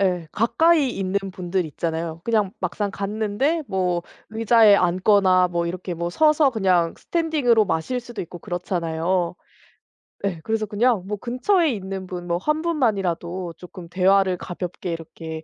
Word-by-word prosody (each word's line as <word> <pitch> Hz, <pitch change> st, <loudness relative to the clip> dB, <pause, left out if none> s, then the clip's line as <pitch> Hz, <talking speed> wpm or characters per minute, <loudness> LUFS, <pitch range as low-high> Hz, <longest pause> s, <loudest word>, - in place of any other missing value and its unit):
예 180 Hz, -4 st, +1 dB
가까이 295 Hz, +5 st, +3 dB
있는 195 Hz, -1 st, -1 dB
분들 180 Hz, -1 st, -2 dB
있잖아요. 160 Hz, +1 st, -4 dB
그냥 215 Hz, -4 st, +1 dB
막상 200 Hz, +2 st, -2 dB
갔는데 215 Hz, +11 st, -1 dB
뭐 180 Hz, -3 st, 0 dB, 0.3 s
의자에 225 Hz, -1 st, +5 dB
앉거나 185 Hz, 0 st, +3 dB
뭐 170 Hz, -1 st, -1 dB
이렇게 180 Hz, +1 st, -4 dB
뭐 170 Hz, +1 st, -3 dB
서서 305 Hz, -, +4 dB
그냥 185 Hz, -7 st, +1 dB
스탠딩으로 290 Hz, -10 st, +1 dB
마실 245 Hz, +12 st, -1 dB
수도 240 Hz, -1 st, -7 dB
있고 175 Hz, 0 st, -9 dB
그렇잖아요. 175 Hz, 0 st, -2 dB, 0.9 s
예 185 Hz, -4 st, -2 dB
그래서 220 Hz, -1 st, -1 dB
그냥 215 Hz, -1 st, +1 dB
뭐 210 Hz, 0 st, -3 dB
근처에 310 Hz, -, +1 dB
있는 190 Hz, -3 st, -5 dB
분 180 Hz, -1 st, -6 dB
뭐 170 Hz, 0 st, 0 dB
1 305 Hz, -, 0 dB
분만이라도 190 Hz, -, -1 dB
쪼끔 180 Hz, -1 st, -11 dB
대화를 190 Hz, +1 st, +3 dB
가볍게 180 Hz, 0 st, -5 dB
이렇게 160 Hz, -1 st, -7 dB
190 Hz, 315 characters per minute, -23 LUFS, 175-225 Hz, 0.9 s, 의자에